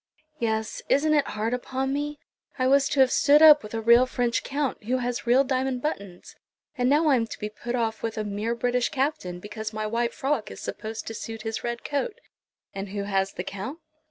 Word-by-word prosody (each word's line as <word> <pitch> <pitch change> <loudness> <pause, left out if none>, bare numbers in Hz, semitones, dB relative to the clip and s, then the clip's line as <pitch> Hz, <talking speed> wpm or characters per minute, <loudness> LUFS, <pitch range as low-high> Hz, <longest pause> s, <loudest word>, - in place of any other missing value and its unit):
"Yes; 220 -2 -1
isn't 305 +2 +3
it 290 -2 +3
hard 220 +3 -2
upon 260 +2 -2
me? 295 +1 -2 0.4
I 255 - +1
was 275 +1 +4
to 275 - +3
have 260 - +5
stood 295 +2 +5
up 300 -2 +9
with 210 +1 -8
a 225 - -2
real 235 +3 +6
French 245 -2 0
Count, 275 -6 -2
who 255 +3 +1
has 245 -2 -3
real 255 +3 +5
diamond 260 -1 -1
buttons, 200 - -5 0.4
and 250 -2 +1
now 305 +3 +4
I 275 - +5
am 230 -1 -1
to - - -7
be 210 - -4
put 240 +3 -5
off 225 -2 -1
with 225 -1 -3
a 215 - -1
mere 210 +3 -2
British 245 +1 0
Captain, 260 - -2
because 215 +2 -6
my 215 0 -3
white 235 +2 -1
frock 270 -4 -1
is - - -9
supposed 220 0 -6
to 225 - -5
suit 225 0 -7
his 225 -1 -4
red 235 0 -3
coat!" 350 - -2 0.5
"And 195 0 -5
who 200 0 -3
has 195 -1 0
the 180 - -4
Count?" 200 +10 -6
240 Hz, 215 wpm, -26 LUFS, 215-270 Hz, 0.5 s, up